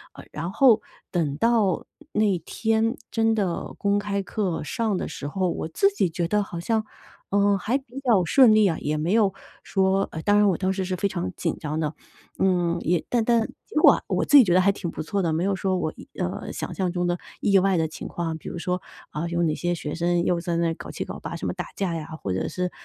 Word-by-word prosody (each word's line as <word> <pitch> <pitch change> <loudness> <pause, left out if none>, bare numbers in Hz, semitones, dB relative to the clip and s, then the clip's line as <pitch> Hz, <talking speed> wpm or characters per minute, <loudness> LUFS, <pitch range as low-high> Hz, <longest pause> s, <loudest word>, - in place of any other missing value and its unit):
“呃， - - -10
然 170 +4 -4
后 230 -5 +5 0.3
等 155 -6 0
到 225 -5 +2 0.3
那 205 -5 +2
天 225 +6 0 0.2
真 225 -1 +2
的 190 -5 -2
公 200 0 +1
开 200 -1 -2
课 185 -7 -2
上 225 +2 -1
的 - - -3
时 145 - -6
候， 185 +3 -1
我 - - -3
自 395 - +3
己 190 - +1
觉 170 0 -2
得 210 +2 +2
好 175 -3 -7
像， 220 +4 0 0.4
呃， 200 0 +3
还 235 +8 0
比 265 -1 -9
较 230 -9 +3
顺 250 +1 +6
利 215 -1 +5
啊， 165 - 0
也 150 +1 -1
没 160 +5 -1
有 205 -4 +3 0.3
说 195 0 +1
呃， 160 - -5
当 205 0 +4
然 210 0 +5
我 175 - +1
当 190 0 0
时 190 -1 -2
是 185 0 -2
非 200 +2 0
常 90 - -3
紧 - - -2
张 155 0 -3
的。 155 -1 -1 0.5
嗯， 175 -3 +2
也 170 -1 0
但 235 -2 +2
但 235 -2 +3 0.2
结 - - -14
果 - - +9
啊 - - -3
我 - - 0
自 290 - +3
己 260 - +10
觉 175 -4 +2
得 185 - +5
还 200 +2 +4
挺 180 -3 -5
不 - - -5
错 200 +4 -1
的， 165 -3 0
没 165 +3 0
有 195 0 +1
说 185 -1 0
我， 155 - -2 0.3
呃， - - -3
想 - - -5
象 185 -2 -1
中 175 0 -1
的 175 0 0 0.2
意 200 -1 +4
外 190 -1 +2
的 160 -1 +1
情 155 - -8
况。 165 -2 -3
比 - - -8
如 - - -6
说， 180 +1 -2 0.3
啊 165 +3 -3
有 170 0 0
哪 155 -2 +2
些 175 0 -1
学 150 -2 -5
生 170 0 +1
又 175 -1 +1
在 170 -1 -2
那 165 -1 +1
搞 - - -9
七 - - -4
搞 - - -7
八 - - -6
什 - - -5
么 - - -1
打 - - -5
架 190 -4 -1
呀， 155 -2 -5
或 95 - -2
者 95 - -1
是 180 -1 -2
185 Hz, 265 characters per minute, -25 LUFS, 170-210 Hz, 0.5 s, 己